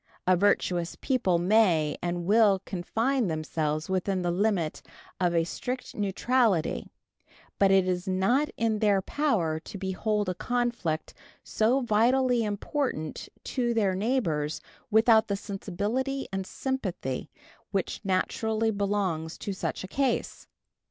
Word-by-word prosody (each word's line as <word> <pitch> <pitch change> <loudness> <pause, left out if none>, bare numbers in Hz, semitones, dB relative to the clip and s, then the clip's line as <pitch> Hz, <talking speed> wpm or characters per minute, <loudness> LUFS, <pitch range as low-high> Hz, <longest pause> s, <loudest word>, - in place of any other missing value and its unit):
A 185 - +5
virtuous 180 -2 +1
people 245 -10 +1
may 175 -5 +3
and 175 0 -2
will 205 -1 +4
confine 225 +7 0
themselves 155 -1 -2
within 190 0 -1
the 175 - +1
limit 180 -4 0 0.4
of 175 -2 +1
a 165 - +3
strict 250 +9 -5
neutrality; 205 -2 +1 0.7
but 195 - +5
it 190 -1 +4
is 180 0 -1
not 195 +11 +2
in 225 -2 +1
their 205 -2 +3
power 185 - 0
to 200 +5 -9
behold 205 +2 -1
a 185 - 0
conflict 235 -7 -2 0.3
so 240 +5 +2
vitally 245 +2 +3
important 210 - -3
to 240 -3 -1
their 200 -4 +2
neighbors 185 - 0 0.3
without 220 +1 +5
the 200 - 0
sensibility 210 +8 -3
and 190 -1 -3
sympathy 185 - -3 0.4
which 195 -3 -2
naturally 220 +3 0
belong 200 -5 -1
to 195 +4 -5
such 190 - -3
a - - -6
case. 265 +4 -1
200 Hz, 125 wpm, -28 LUFS, 180-230 Hz, 0.7 s, A